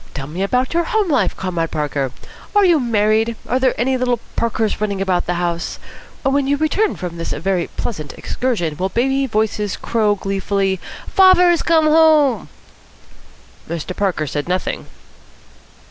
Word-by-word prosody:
Tell 135 - -4
me 160 +6 -6
about 250 +8 0
your 340 0 +1
home 435 -7 0
life, - - +1
Comrade 175 -3 -2
Parker. 145 -4 -2 0.4
Are 410 -1 +6
you 340 -4 +4
married? 225 -1 +1
Are 250 +3 +1
there 260 -3 +1
any 260 +2 +1
little 245 -2 0 0.2
Parkers 225 -2 -1
running 200 -2 -1
about 185 -3 0
the 175 - 0
house? 175 -1 -2 0.5
When 270 0 +1
you 285 +1 +2
return 350 +8 +1
from 175 -2 -6
this 165 - -4
very 185 -1 -1
pleasant 155 -11 -4
excursion 175 - -2
will 190 +3 -1
baby 270 +5 +1
voices 210 -3 -1
crow 215 -3 +1
gleefully, 195 -1 -1 0.3
'Fahzer's 360 -3 +5
come 325 -2 +3
home'?" 310 -4 +4 1.2
Mr. 170 +2 -4
Parker 190 -6 0
said 145 +2 -3
nothing. 185 +1 -2
215 Hz, 150 wpm, -19 LUFS, 180-270 Hz, 1.2 s, Are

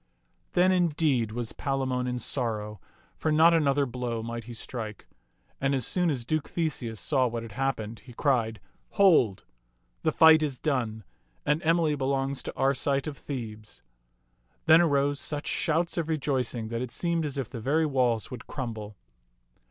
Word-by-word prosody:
Then, 185 +1 +4
indeed, 150 - +2
was 115 0 -4
Palamon 130 -2 -1
in 125 0 -2
sorrow, 110 -5 -2 0.3
for 155 - -1
not 160 +2 +6
another 145 -3 +3
blow 120 -2 -3
might 115 0 -5
he 120 - -8
strike. 110 -2 -7 0.6
And 135 0 +2
as 130 - -2
soon 180 -2 +1
as 130 -6 -2
Duke 155 +2 -1
Theseus 135 - -3
saw 130 +4 +2
what 115 -1 -4
had 115 - -9
happened, 115 -3 -2
he 120 +5 -14
cried, 115 -5 +1 0.2
" - - -41
Hold! 160 - +4 0.6
The 155 - +2
fight 160 0 +7
is 145 -4 -1
done, 120 -8 -1 0.4
and 150 +2 +2
Emily 165 -2 +2
belongs 135 -1 -1
to - - -7
Arcite 135 +1 +1
of 155 -2 -4
Thebes." 110 -7 -7 0.8
Then 160 +1 +7
arose 145 -3 +2
such 145 -1 -4
shouts 170 +1 0
of 165 -1 -2
rejoicing 130 -7 -1
that 115 0 -3
it 125 - -3
seemed 170 +4 -1
as 145 -2 -3
if 135 -5 -3
the 115 - -6
very 155 +7 +2
walls 125 -6 +1
would 125 -3 -8
crumble. 110 -6 -6
135 Hz, 165 wpm, -28 LUFS, 115-155 Hz, 0.8 s, fight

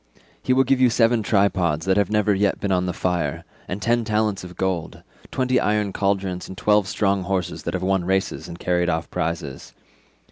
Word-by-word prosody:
He - - -1
will 130 +1 +5
give 135 0 +1
you 125 - +6
seven 115 0 +3
tripods 95 -7 +1
that 95 0 +2
have 100 -2 +2
never 105 -1 +2
yet 100 +1 +1
been 100 - -2
on 90 -1 +1
the - - 0
fire, 85 -6 -2 0.2
and 95 - -4
ten 120 +2 +1
talents 105 -2 0
of 90 0 -10
gold; 95 -3 -2 0.3
twenty 130 -1 +1
iron 105 -2 0
cauldrons, 95 -2 -1
and 95 - -9
twelve 105 -2 +3
strong 100 -1 +1
horses 90 -2 -2
that - - -3
have 90 - -3
won 95 -1 +1
races 95 -2 -1
and 85 -1 -8
carried 90 0 0
off 80 -2 -2
prizes. 80 -4 -4
95 Hz, 200 wpm, -23 LUFS, 90-105 Hz, 0.3 s, you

